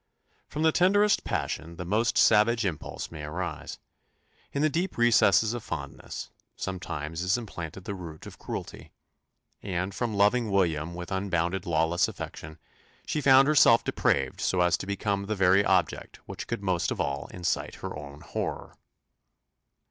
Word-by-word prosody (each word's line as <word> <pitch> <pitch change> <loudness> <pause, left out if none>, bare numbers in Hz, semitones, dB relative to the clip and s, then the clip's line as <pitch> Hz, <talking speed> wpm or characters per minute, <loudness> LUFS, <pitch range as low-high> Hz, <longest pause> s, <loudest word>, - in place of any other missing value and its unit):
From 150 +2 -3
the 160 - +5
tenderest 205 +4 +3
passion 85 +1 -3
the 85 - -6
most 110 +6 +1
savage 115 +1 +4
impulse 85 -6 -4
may 80 -2 -8
arise: 80 0 -5 0.7
in 140 - -1
the - - +5
deep 175 +5 -2
recesses 110 -2 +4
of 120 - -4
fondness, 75 -4 -6 0.2
sometimes 85 -4 -4
is 95 +4 +2
implanted 95 -6 -7
the 100 - -3
root 85 -5 -9
of - - -11
cruelty; - - -7 0.7
and 95 0 -3
from 115 0 -2
loving 105 +3 +3
William 85 -4 0
with 90 +1 -7
unbounded 95 -1 -1
lawless 80 +1 +2
affection, 80 +1 -8 0.5
she 150 - -1
found 135 0 +6
herself 125 -6 +6
depraved 70 -2 0
so 90 - +1
as 90 -1 +4
to - - -7
become 100 0 -1
the 110 - -1
very 95 +1 +4
object 95 -3 0
which - - -7
could 100 - -4
most 90 -3 0
of - - -3
all 70 +1 -2
excite 90 -1 -2
her - - -6
own 75 0 -9
horror! - - -5
95 Hz, 155 wpm, -28 LUFS, 85-110 Hz, 0.7 s, found